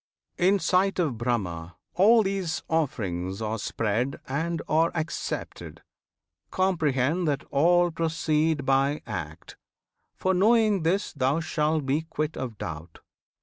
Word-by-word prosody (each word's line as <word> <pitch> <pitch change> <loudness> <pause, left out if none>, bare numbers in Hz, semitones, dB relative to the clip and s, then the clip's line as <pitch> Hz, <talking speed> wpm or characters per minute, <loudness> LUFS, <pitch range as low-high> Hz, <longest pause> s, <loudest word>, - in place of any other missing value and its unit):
In 190 +3 +4
sight 185 +2 +1
of 150 -11 -1
Brahma 90 -9 -2 0.2
all 215 +6 +5
these 190 -4 -2
offerings 95 - -2
Are 110 0 -3
spread 115 +6 -1
and 165 +5 -2
are 165 +2 +3
accepted! 160 0 -5 0.7
Comprehend 160 -3 +1
That 145 -1 0
all 175 +4 +4
proceed 160 -2 0
by 135 +2 +1
act; 85 -8 -7 0.6
for 190 - 0
knowing 215 +1 +3
this, 180 +5 0
Thou 140 +2 +1
shalt 155 -2 0
be 140 +4 +1
quit 155 -1 -4
of 120 -5 -5
doubt. 85 -4 -7
155 Hz, 120 wpm, -26 LUFS, 120-175 Hz, 0.7 s, all